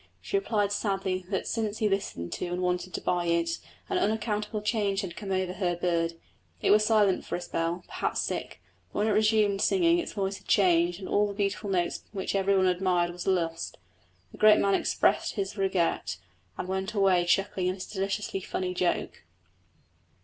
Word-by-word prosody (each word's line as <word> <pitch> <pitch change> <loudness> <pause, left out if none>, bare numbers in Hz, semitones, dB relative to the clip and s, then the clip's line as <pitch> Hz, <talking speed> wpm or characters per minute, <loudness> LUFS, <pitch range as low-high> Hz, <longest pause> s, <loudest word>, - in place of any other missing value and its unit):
She - - -4
replied 215 - +1
sadly 195 -3 -1
that 190 - -1
since 220 -2 -2
he 215 - +1
listened 195 - -2
to - - -3
and 175 +1 -3
wanted 180 +1 -1
to - - -3
buy 175 -1 0
it 170 0 +1 0.3
an 375 -2 0
unaccountable 210 -3 -1
change 205 -3 0
had 175 -3 -6
come 200 -2 -6
over 185 -1 0
her 180 -3 -1
bird. 170 -1 0 0.4
It - - +2
was 210 +1 +6
silent 210 -4 +3
for - - -4
a 175 - -4
spell, 170 +1 -2
perhaps - - -2
sick, - - -4 0.3
but - - -7
when 210 +1 +2
it - - +2
resumed 210 -1 +3
singing 345 -2 +3
its 340 - -4
voice 195 -1 -2
had - - -24
changed 175 -3 +3
and 190 - -7
all 205 0 +2
the 200 - -6
beautiful 200 0 -1
notes 175 -3 0
which 195 -2 -3
everyone 195 -1 +3
admired 180 -1 +2
were 180 +2 -1
lost. 165 -2 -2 0.5
The - - -14
great 215 0 +7
man 200 0 +2
expressed - - +2
his 195 -2 -3
regret, 180 - 0 0.4
and - - -4
went 190 +3 -3
away 190 -3 +4
chuckling 185 0 +1
at 185 - -2
his 185 - -6
deliciously 195 0 -2
funny 180 0 -3
joke. 180 -1 -1
195 Hz, 185 wpm, -28 LUFS, 180-210 Hz, 0.5 s, great